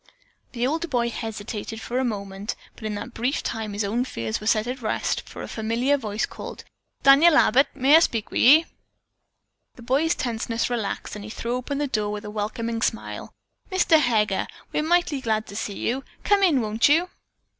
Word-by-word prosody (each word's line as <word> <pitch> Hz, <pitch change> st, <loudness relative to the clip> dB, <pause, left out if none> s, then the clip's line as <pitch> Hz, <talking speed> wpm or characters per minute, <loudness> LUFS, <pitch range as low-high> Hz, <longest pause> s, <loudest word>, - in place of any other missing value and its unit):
The 240 Hz, -1 st, -1 dB
older 320 Hz, +5 st, -1 dB
boy 240 Hz, -5 st, 0 dB
hesitated 220 Hz, -1 st, -5 dB
for 245 Hz, +3 st, -3 dB
a -, -, +1 dB
moment, 200 Hz, -2 st, -4 dB, 0.2 s
but 220 Hz, -, -11 dB
in 215 Hz, -1 st, -2 dB
that 210 Hz, +4 st, -6 dB
brief 250 Hz, +5 st, -1 dB
time 220 Hz, -2 st, -3 dB
his 205 Hz, +1 st, -1 dB
own 225 Hz, +5 st, 0 dB
fears 115 Hz, -, -4 dB
were 215 Hz, -, -5 dB
set 215 Hz, -1 st, +3 dB
at 250 Hz, +1 st, -5 dB
rest, 215 Hz, -, -1 dB
for -, -, -8 dB
a -, -, -6 dB
familiar 230 Hz, +5 st, 0 dB
voice 215 Hz, -5 st, -2 dB
called, -, -, -9 dB, 0.4 s
"Daniel 300 Hz, +4 st, +7 dB
Abbott, 275 Hz, -2 st, +5 dB
may 275 Hz, +4 st, +5 dB
I -, -, +9 dB
speak 230 Hz, -10 st, -1 dB
with -, -, 0 dB
ye?" 305 Hz, +6 st, +7 dB, 1.1 s
The 240 Hz, -, -13 dB
boy's 280 Hz, +7 st, +2 dB
tenseness 230 Hz, 0 st, -2 dB
relaxed 225 Hz, -4 st, -3 dB
and 210 Hz, -, -7 dB
he 215 Hz, -, -8 dB
threw 235 Hz, +2 st, -3 dB
open 255 Hz, +3 st, -3 dB
the 290 Hz, -, 0 dB
door 215 Hz, -6 st, -1 dB
with 210 Hz, 0 st, -5 dB
a 210 Hz, -, -6 dB
welcoming 225 Hz, +2 st, -3 dB
smile. 225 Hz, -, -3 dB, 0.4 s
"Mr. 345 Hz, -4 st, +4 dB
Heger, 215 Hz, -7 st, +1 dB, 0.3 s
we're -, -, +1 dB
mighty 320 Hz, -3 st, +1 dB
glad 220 Hz, -2 st, 0 dB
to 200 Hz, -, -10 dB
see 205 Hz, -2 st, -4 dB
you! 260 Hz, +4 st, -2 dB, 0.2 s
Come 410 Hz, -1 st, +3 dB
in, 325 Hz, -9 st, +4 dB
won't 220 Hz, +4 st, +2 dB
you?" 330 Hz, +5 st, +4 dB
235 Hz, 195 wpm, -24 LUFS, 215-275 Hz, 1.1 s, I